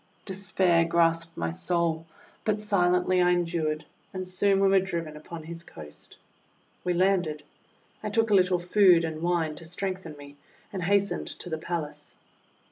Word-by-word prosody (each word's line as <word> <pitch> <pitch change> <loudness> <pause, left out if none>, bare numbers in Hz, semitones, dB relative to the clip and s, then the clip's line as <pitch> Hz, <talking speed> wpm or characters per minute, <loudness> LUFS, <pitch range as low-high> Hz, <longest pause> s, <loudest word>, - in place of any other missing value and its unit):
Despair 185 -3 +2
grasped 165 0 +1
my 80 0 -1
soul, 165 - -1 0.4
but 215 -1 0
silently 180 -3 +2
I 180 0 +4
en 175 0 +1
dured, 155 -2 -2 0.3
and 185 0 -4
soon 195 +2 +2
we 195 - +4
were 195 0 +5
driven 170 -5 -4
upon 160 +2 -9
his 165 +1 -7
coast. 75 - -11 0.7
We 180 -1 0
landed. 180 -5 +1 0.6
I 215 - -3
took 225 +1 +1
a - - +5
little 185 -2 +4
food 180 -1 +5
and 160 -1 -4
wine 170 -2 0
to 165 - -8
strengthen 180 -2 -4
me, 145 0 -12 0.4
and 190 - -3
hastened 200 +1 +1
to 180 - -7
the 160 - -2
palace. 160 -3 -5
175 Hz, 160 wpm, -27 LUFS, 165-190 Hz, 0.7 s, were